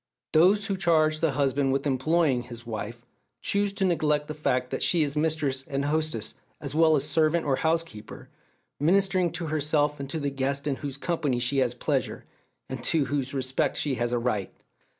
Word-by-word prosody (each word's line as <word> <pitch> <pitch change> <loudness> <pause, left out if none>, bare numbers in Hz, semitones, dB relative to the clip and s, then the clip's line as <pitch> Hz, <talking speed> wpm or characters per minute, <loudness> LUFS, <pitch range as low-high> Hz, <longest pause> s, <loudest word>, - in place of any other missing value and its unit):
Those 190 +6 +5
who 195 -1 -2
charge 155 -4 +3
the 160 -3 +1
husband 135 0 +1
with 135 +1 -1
"employing" 140 0 +2
his 120 -1 -10
wife 115 +1 -6 0.4
choose 200 0 +1
to 195 -1 0
neglect 150 -4 +1
the 150 - -4
fact 125 -4 -1
that - - -3
she 170 -3 +3
is 145 0 -2
mistress 150 -4 0
and 140 +1 -3
hostess, 155 -6 -1 0.3
as - - -5
well 160 0 +5
as 145 0 -1
"servant" 160 +2 +2
or 135 -2 +1
"housekeeper," 160 -9 -2 0.5
ministering 185 +2 +2
to 170 0 -3
herself 150 -1 +1
and 135 -1 -6
to 160 - -3
the 145 -1 -2
guests 140 +1 -1
in 140 -3 -1
whose 140 -2 -6
company 150 -5 -1
she 125 +3 +1
has 125 -2 +1
pleasure, - - -2 0.4
and 130 -2 -6
to 155 -4 +2
whose 135 -1 -2
respect 130 -1 0
she 145 - 0
has 120 -1 -1
a 120 - +1
right. 115 -5 -1
145 Hz, 190 wpm, -27 LUFS, 130-160 Hz, 0.5 s, Those